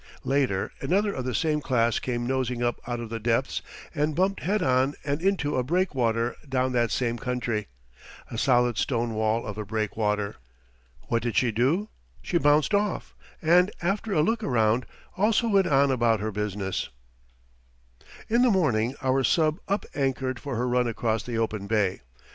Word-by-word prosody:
Later 135 -9 0
another 200 +3 +1
of 130 - -4
the 125 -3 -2
same 155 +1 +1
class 120 -4 +1
came 120 -1 -2
nosing 125 -1 -1
up 120 0 -1
out 120 -1 -2
of 115 -1 -7
the 115 - -3
depths, 120 +4 0 0.3
and 150 -1 0
bumped 190 +3 +1
head 205 +6 0
on 130 +2 +2
and 145 +2 -1
into 170 -7 +1
a 125 - +1
breakwater 125 -8 0
down 130 -1 +1
that 120 -2 +1
same 120 +3 -1
country 120 -5 -2 0.6
a - - -5
solid 120 -1 +2
stone 120 -3 0
wall 110 +1 0
of 105 0 -6
a - - -2
breakwater. 105 0 -1 0.7
What 115 -1 -1
did 120 0 -2
she 125 -2 +3
do? 140 - +1 0.3
She 170 - +1
bounced 150 +5 +3
off, 205 -1 0 0.3
and, 175 +4 +5
after 200 +5 -1
a 155 -6 +3
look 225 +6 0
around, 115 - +2 0.3
also 215 +3 +2
went 195 -3 +3
on 140 -2 +4
about 120 -3 +2
her 110 +2 -2
business. 100 -2 -3 1.4
In 235 +2 +3
the 250 - +5
morning 130 - +1
our 135 0 +2
sub 155 - +2
up 200 +1 -1
anchored 130 -2 -1
for 140 -3 -5
her 120 +2 0
run 125 0 +2
across 115 -1 -1
the 120 0 -4
open 110 -3 -2
bay. 100 -3 +1
125 Hz, 170 wpm, -26 LUFS, 115-155 Hz, 1.4 s, and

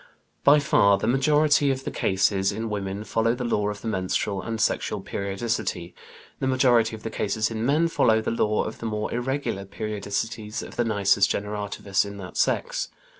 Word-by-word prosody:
By 145 +1 +7
far 100 -8 +4
the - - -3
majority 145 +4 +3
of 135 0 -1
the - - -4
cases 95 0 +1
in 110 +2 -4
women 100 0 -3
follow 115 +2 +1
the 125 - -4
law 105 -3 0
of 105 -1 -6
the - - -6
menstrual 95 -1 -1
and 115 -1 -4
sexual - - 0
periodicity; 100 -3 -3 0.5
the 135 - -1
majority 120 -4 +3
of 110 - -13
the 115 - -4
cases 110 +2 -1
in 110 0 -3
men 155 +4 +3
follow 110 -8 +3
the 110 - -2
law 105 -2 +1
of 110 - -6
the 115 - -4
more 105 -1 -3
irregular 125 -4 -2
periodicities 105 +2 -4
of - - -10
the 120 - +1
nisus 100 -2 +3
generativus 100 -1 -1
in 100 0 -8
that 95 -2 -9
sex. - - 0
110 Hz, 180 wpm, -25 LUFS, 100-120 Hz, 0.5 s, By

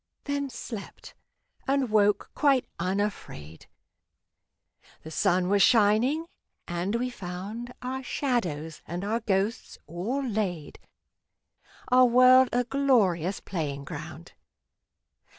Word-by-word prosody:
Then 285 -1 -2
slept, 230 -4 -9 0.5
and 270 -3 +1
woke 210 -1 +2
quite 275 -4 +2
unafraid. 185 - -4 1.4
The 160 - -9
sun 180 +1 +1
was 200 +1 +3
shining, 245 +7 +4 0.4
and 175 +5 -2
we 250 +2 -1
found 200 +5 -7
Our 260 +1 -3
shadows 175 - -2
and 175 +3 -4
our 225 +3 0
ghosts 205 0 -2
all 200 - -3
laid, 195 - -3 1.1
Our 255 0 +6
world 255 +1 +6
a 245 +1 +1
glorious 220 - +1
playing 145 -7 -4
ground. - - -9
215 Hz, 100 wpm, -27 LUFS, 180-255 Hz, 1.4 s, Our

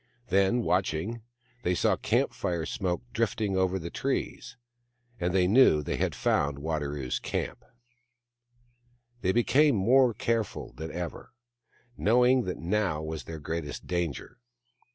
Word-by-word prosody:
Then, 100 +6 +3
watch 90 -4 +1
ing, 110 +9 -4 0.4
they 90 -3 +1
saw - - +2
camp - - 0
fire 85 -3 -2
smoke 95 -2 -2
drifting 110 -3 0
over 95 0 +1
the 85 -2 -6
trees; - - -3 0.6
and 90 -1 0
they 90 0 +3
knew 95 - +5
they - - -2
had - - -1
found 70 -1 +1
Wadaro's 75 -3 -2
camp. - - -4 1.6
They 95 - +2
became 130 +6 +4
more 120 +4 +4
careful 115 -1 -2
than 80 +1 -6
ever, 85 +1 -6 0.6
knowing 125 +3 +4
that 90 - -3
now 90 -3 -1
was 80 -4 -5
their 80 - -6
greatest 75 0 -5
danger. 85 - -3
90 Hz, 130 wpm, -28 LUFS, 80-115 Hz, 1.6 s, knew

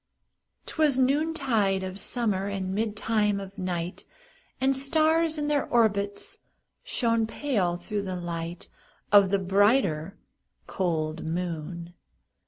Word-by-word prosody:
'Twas 300 -4 +1
noontide 260 -8 +1
of 190 +1 -4
summer, 205 -6 -1
And 190 -1 -3
midtime 215 -1 0
of 195 0 -8
night, 180 -1 -3 0.5
And 265 +1 +2
stars, 315 +3 +2
in 295 -1 -1
their 295 -2 +1
orbits, 205 -4 0 0.4
Shone 230 - +1
pale, 210 -10 0
through 205 +4 -3
the 190 -2 -4
light 170 -1 -5 0.4
Of 200 -2 +7
the 200 - +3
brighter, 195 - +2 0.5
cold 160 -3 -2
moon. 170 0 -4
200 Hz, 110 wpm, -27 LUFS, 180-255 Hz, 0.5 s, Of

